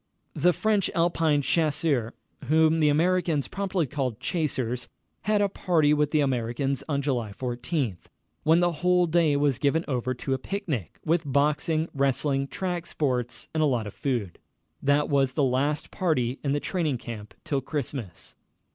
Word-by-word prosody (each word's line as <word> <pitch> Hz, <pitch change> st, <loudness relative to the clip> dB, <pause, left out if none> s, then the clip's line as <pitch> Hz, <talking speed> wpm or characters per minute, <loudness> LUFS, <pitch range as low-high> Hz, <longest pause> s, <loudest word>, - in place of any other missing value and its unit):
The 175 Hz, +4 st, +3 dB
French 210 Hz, +1 st, +1 dB
Alpine 165 Hz, -4 st, +2 dB
Chasseurs 150 Hz, -7 st, +1 dB, 0.3 s
whom 160 Hz, +3 st, +4 dB
the 150 Hz, -1 st, +4 dB
Americans 165 Hz, -1 st, +2 dB
promptly 195 Hz, -4 st, -1 dB
called 130 Hz, -5 st, -3 dB
"chasers" 125 Hz, -6 st, -2 dB, 0.4 s
had 210 Hz, 0 st, +3 dB
a -, -, +3 dB
party 165 Hz, -6 st, +2 dB
with 150 Hz, -1 st, +2 dB
the 155 Hz, 0 st, +2 dB
Americans 130 Hz, 0 st, -1 dB
on 140 Hz, -1 st, 0 dB
July 120 Hz, -7 st, -1 dB
14, 125 Hz, -, -2 dB, 0.4 s
when 160 Hz, +3 st, +4 dB
the 175 Hz, 0 st, +3 dB
whole 180 Hz, +2 st, +2 dB
day 165 Hz, -3 st, +3 dB
was 140 Hz, -3 st, +1 dB
given 155 Hz, +4 st, +1 dB
over 130 Hz, -2 st, -1 dB
to 135 Hz, +2 st, -2 dB
a 130 Hz, -, -1 dB
picnic, 170 Hz, -, -4 dB
with 165 Hz, +1 st, +2 dB
boxing, 150 Hz, +3 st, +1 dB
wrestling, 140 Hz, 0 st, +1 dB
track 175 Hz, +1 st, -3 dB
sports, 125 Hz, -5 st, -1 dB
and 160 Hz, -, 0 dB
a 155 Hz, -, +4 dB
lot 120 Hz, -5 st, 0 dB
of 105 Hz, -, -7 dB
food. 120 Hz, -10 st, -2 dB, 0.4 s
That 145 Hz, +1 st, +2 dB
was 135 Hz, -2 st, +2 dB
the 145 Hz, -, +1 dB
last 135 Hz, +3 st, 0 dB
party 130 Hz, -8 st, 0 dB
in 140 Hz, -, 0 dB
the 145 Hz, -, +1 dB
training 155 Hz, -6 st, -1 dB
camp 110 Hz, -3 st, -8 dB
till 140 Hz, -2 st, -1 dB
Christmas. 130 Hz, -, -5 dB
145 Hz, 160 wpm, -26 LUFS, 130-165 Hz, 0.4 s, whom